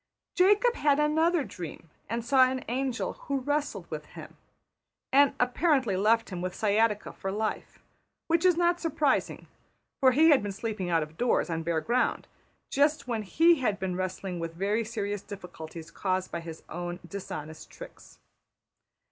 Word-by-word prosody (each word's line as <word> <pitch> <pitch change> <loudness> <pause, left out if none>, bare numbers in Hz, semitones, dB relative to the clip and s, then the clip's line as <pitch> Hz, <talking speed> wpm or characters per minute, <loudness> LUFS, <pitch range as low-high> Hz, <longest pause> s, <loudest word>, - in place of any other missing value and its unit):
Jacob 415 +6 +4
had 290 -8 +2
another 315 +2 +2
dream, 165 - -9 0.2
and 230 +1 -2
saw 260 +1 +5
an 260 0 -4
angel 255 +1 -2
who 280 - 0
wrestled 290 +2 -2
with - - -5
him, - - -11 0.8
and 285 +1 +5
apparently 250 - +2
left 220 +3 +2
him 180 -1 -4
with 180 0 -4
sciatica 210 0 +1
for 190 - -4
life; 215 +2 -3 0.5
which 335 0 +2
is 360 -2 +4
not 345 0 +2
surprising, 305 -4 0 0.5
for 260 -1 +6
he 315 +5 +6
had 285 - +5
been 205 -1 -3
sleeping 210 -3 -4
out 165 -2 +2
of 155 +1 -11
doors 245 -7 +1
on 165 0 -1
bare 165 -1 -1
ground, 240 +9 0 0.4
just 290 0 +2
when 230 -3 -1
\emph{he} 325 - +4
had 215 -6 0
been 185 -1 -3
wrestling 185 -1 -4
with 165 0 -5
very 205 +5 0
serious 205 -2 -3
difficulties 170 -5 -9
caused 185 -1 -2
by 170 - -3
his 165 -1 -9
own 175 +1 -5
dishonest 160 -4 -7
tricks. - - -13
220 Hz, 160 wpm, -28 LUFS, 185-285 Hz, 0.8 s, for